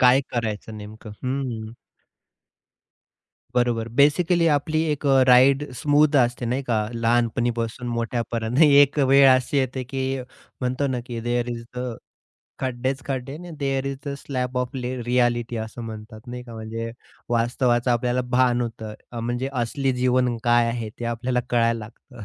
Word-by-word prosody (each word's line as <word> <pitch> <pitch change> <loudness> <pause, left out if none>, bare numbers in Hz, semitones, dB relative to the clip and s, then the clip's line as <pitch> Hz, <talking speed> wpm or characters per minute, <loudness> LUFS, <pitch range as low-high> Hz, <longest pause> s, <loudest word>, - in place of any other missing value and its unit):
काय 125 +1 +6
करायचं 110 -2 -3
नेमकं? 110 +1 -10
हं. 125 -4 -3 1.8
बरोबर. 120 -2 +1
बेसिकली 160 +7 +3
आपली 155 +2 0
एक 150 0 -2
अ, 135 -1 +5
राईड 130 +2 +6
स्मूथ 145 +3 +3
असते 120 -1 +2
नाही 125 +4 -1
का, 120 -4 0 0.2
लहानपणीपासून 115 0 0
मोठ्यापर्यंत 115 0 -2
एक 145 -1 +6
वेळ 135 0 +6
अशी 130 +2 0
येते 130 -1 -1
की 135 +1 -4 0.6
म्हणतो 130 +2 0
ना, 130 -2 -1
की 120 -2 -5
देअर 120 +1 -1
ईज 115 -1 -5
द 125 -2 -3 0.6
खड्डेच 130 +1 -2
खड्डे, 135 0 -3
and 165 - -9
there 135 -2 -1
is 140 0 -3
the 140 - -2
slab 125 -2 -3
of 125 -1 -1
ले 125 -1 -3
रिअ‍ॅलिटी 120 -1 +1
असं 110 +2 -9
म्हणतात 110 0 -8
नाही 125 0 -6
का, 115 -2 -10
म्हणजे 115 +1 -5 0.4
वास्तवाचं 120 +1 +1
आपल्याला 125 +1 +1
भान 125 -1 +3
होतं. 110 -2 -5 0.2
अ, 120 - -4
म्हणजे 120 +3 -2
असली 130 +2 -1
जीवन 125 -1 +1
काय 120 0 +4
आहे 115 -1 -3
ते 120 - -5
आपल्याला 125 +2 -1
कळायला 115 -1 +2
लागतं, 115 +1 -11
125 Hz, 150 wpm, -24 LUFS, 115-135 Hz, 1.8 s, काय